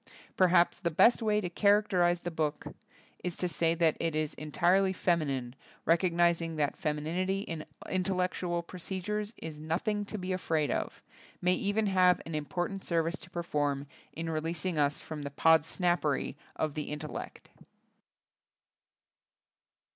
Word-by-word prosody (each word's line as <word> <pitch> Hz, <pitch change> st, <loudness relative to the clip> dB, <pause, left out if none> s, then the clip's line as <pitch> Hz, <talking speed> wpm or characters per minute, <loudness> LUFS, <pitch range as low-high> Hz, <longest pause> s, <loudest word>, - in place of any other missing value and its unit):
Perhaps 175 Hz, -2 st, +4 dB
the 170 Hz, -, 0 dB
best 230 Hz, +10 st, +5 dB
way 210 Hz, -1 st, +2 dB
to 180 Hz, -, -2 dB
character 200 Hz, 0 st, +3 dB
ize 175 Hz, 0 st, +2 dB
the 175 Hz, -, -4 dB
book 155 Hz, -2 st, -2 dB, 0.6 s
is 180 Hz, -1 st, -2 dB
to 180 Hz, -, -1 dB
say 165 Hz, 0 st, +1 dB
that 165 Hz, -2 st, +3 dB
it 165 Hz, -2 st, -1 dB
is 155 Hz, -1 st, -1 dB
entirely 180 Hz, +6 st, +2 dB
feminine, 140 Hz, -9 st, 0 dB, 0.3 s
recognizing 170 Hz, -1 st, +2 dB
that 150 Hz, -2 st, 0 dB
femininity 175 Hz, +4 st, -1 dB
in 165 Hz, -6 st, -5 dB, 0.2 s
intellectual 180 Hz, -2 st, -1 dB
procedures 195 Hz, +5 st, -4 dB
is 155 Hz, -2 st, -7 dB
nothing 175 Hz, +7 st, -1 dB
to 215 Hz, -, -5 dB
be 185 Hz, -1 st, -3 dB
afraid 160 Hz, -5 st, 0 dB
of, -, -, -3 dB, 0.4 s
may 180 Hz, +1 st, +3 dB
even 205 Hz, +3 st, +1 dB
have 185 Hz, -2 st, +4 dB
an 165 Hz, -, -6 dB
im 150 Hz, -1 st, -2 dB
portant 180 Hz, +5 st, -3 dB
service 165 Hz, +1 st, 0 dB
to 185 Hz, -, -12 dB
perform 145 Hz, -5 st, -1 dB, 0.3 s
in 165 Hz, +1 st, -5 dB
releasing 165 Hz, +2 st, -2 dB
us 145 Hz, 0 st, +1 dB
from 155 Hz, -2 st, -6 dB
the 140 Hz, -, -4 dB
Podsnappery 160 Hz, -1 st, +2 dB, 0.2 s
of 155 Hz, -2 st, -1 dB
the 150 Hz, 0 st, -4 dB
intel 150 Hz, +1 st, -5 dB
lect. -, -, -8 dB
170 Hz, 145 wpm, -31 LUFS, 155-185 Hz, 0.6 s, best